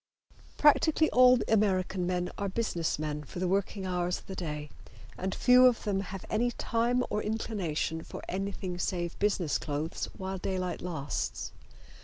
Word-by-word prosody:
Practically 315 +1 +4
all 250 0 +7
American 190 -4 +1
men 180 0 -1
are 200 -1 -2
business 185 -6 -1
men 150 0 -3
for 150 - -10
the 180 +1 0
working 195 +1 -1
hours 180 -1 0
of - - -14
the 190 - -7
day, 150 -4 -5 0.4
and 190 +1 -3
few 250 0 +7
of 245 -2 +1
them 200 -2 0
have 195 -1 -6
any 235 +3 +1
time 240 +1 0
or 210 - 0
inclination 190 -7 -2
for - - -9
anything 190 -1 -3
save 175 -2 -2
business 195 -6 +1
clothes 150 +2 -3
while 190 0 -4
daylight 185 -1 -2
lasts. 155 -6 -3
190 Hz, 155 wpm, -30 LUFS, 175-215 Hz, 0.4 s, all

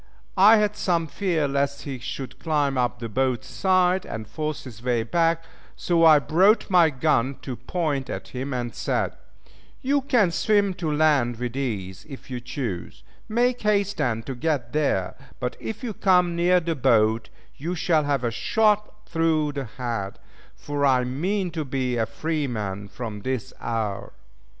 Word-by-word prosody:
I 210 +4 +9
had 210 -1 +1
some 170 -5 0
fear 165 -2 0
lest 140 0 -1
he 135 -3 -5
should 130 +2 -6
climb 145 -4 0
up 125 -1 0
the 115 - -5
boat's 130 +3 0
side, 185 -1 +2
and 110 -1 -6
force 155 +3 -4
his 115 -5 -11
way 120 -2 +1
back; 165 +6 +1 0.3
so 170 -2 +1
I 160 -2 +8
brought 185 +10 +3
my 175 -3 +6
gun 135 -2 +1
to 130 - -4
point 140 +1 -2
at - - -5
him, 130 +2 -5
and 120 -3 -3
said, - - -1 0.7
"You 280 +2 +2
can 240 -9 +3
swim 200 +2 +2
to 165 -3 -3
land 145 -6 +2
with 125 +1 -4
ease 100 -9 -4
if 135 -1 -10
you 125 - -3
choose, 120 -8 -5 0.3
make 245 +3 +1
haste 205 -1 +1
then 115 -2 0
to 135 - -5
get 130 -2 -2
there; 140 -12 +1 0.3
but 125 -1 -3
if 225 +3 -6
you 230 -3 -3
come 180 -3 +3
near 180 +1 +4
the 165 -1 -2
boat 115 -5 +2 0.3
you 170 +6 -3
shall 160 -2 +2
have 140 -3 0
a 120 - 0
shot 210 - +1
through 160 -2 +1
the 140 -2 -4
head, 115 -4 -4 0.4
for 145 -1 -3
I 130 -2 +4
mean 175 +9 -1
to 160 -1 -3
be 130 -3 -2
a 110 -1 0
free 155 +5 -2
man 100 -4 -4
from 105 0 -6
this 130 -1 -3
hour." 110 -4 -3
145 Hz, 170 wpm, -24 LUFS, 125-175 Hz, 0.7 s, I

